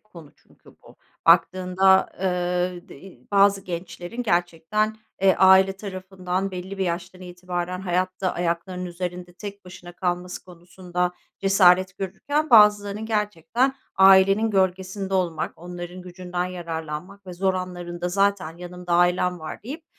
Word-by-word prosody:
konu 170 -8 -15
çünkü - - -22
bu. - - -18 0.3
Baktığında, 185 +2 +4
eee, 180 0 -1
d 175 - -12
eee, 180 -10 -14
bazı 200 0 +4
gençlerin 175 +5 -6
gerçekten, 175 +3 0 0.3
eee, 190 -1 +5
aile 190 0 +6
tarafından 190 -1 -4
belli 190 +1 -7
bir 190 - 0
yaştan 175 +1 -4
itibaren 180 0 -5
hayatta 185 0 -1
ayaklarının 175 +1 -3
üzerinde 175 0 -6
tek 200 +1 -9
başına 175 -1 -11
kalması 180 0 -3
konusunda 180 0 -4 0.3
cesaret 185 -1 +4
görürken, 285 - -2
bazılarının 210 -1 +5
gerçekten 215 - 0 0.2
ailenin 195 +3 +6
gölgesinde 190 0 -1
olmak, 175 -4 -1
onların 175 +1 -8
gücünden 180 0 -4
yararlanmak 175 +2 -6
ve 180 - -7
zor 190 +1 0
anlarında 175 -1 -4
zaten 195 -3 0
yanımda 180 0 -7
ailem 180 +1 +2
var 155 +3 -8
deyip 295 +8 -8
185 Hz, 125 wpm, -24 LUFS, 175-195 Hz, 0.3 s, aile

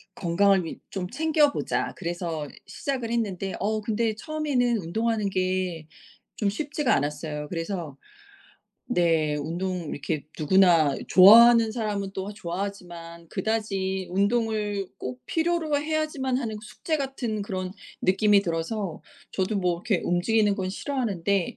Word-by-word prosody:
'건강을 190 +1 +3
위 - - -7
좀 180 -2 -4
챙겨 305 - +3
보자.' - - -2
그래서 170 -4 -3 0.2
시작을 255 -5 -3
했는데 195 -5 -2
어 215 +3 0
근데 220 +1 0
처음에는 265 -3 0
운동하는 215 +3 -1
게 185 -4 -1 0.5
좀 205 - +1
쉽지가 290 +4 0
않았어요. 150 +1 -3
그래서 165 -4 -4 0.9
네. 165 -8 +2
운동을 170 +3 -3
이렇게 145 +1 -3
누구나 165 -3 +4
좋아하는 225 +4 +8
사람은 205 -4 -2
또 195 +2 -4
좋아하지만 175 -3 -6
그다지 195 -3 -2
운동을 205 0 0
꼭 125 0 -6
필요로 325 -3 +1
해야지만 300 -4 -1
하는 220 -5 -3
그 220 - -12
숙제 310 +6 -3
같은 260 -6 -3
그런 185 -2 -4 0.3
느낌이 200 +2 +4
들어서 170 +1 -3 0.3
저도 195 +2 -1
뭐 180 -2 +1
이렇게 180 +1 -1
움직이는 205 +4 +2
건 185 -1 -2
싫어하는데 200 -7 -1
200 Hz, 305 characters per minute, -26 LUFS, 175-230 Hz, 0.9 s, 좋아하는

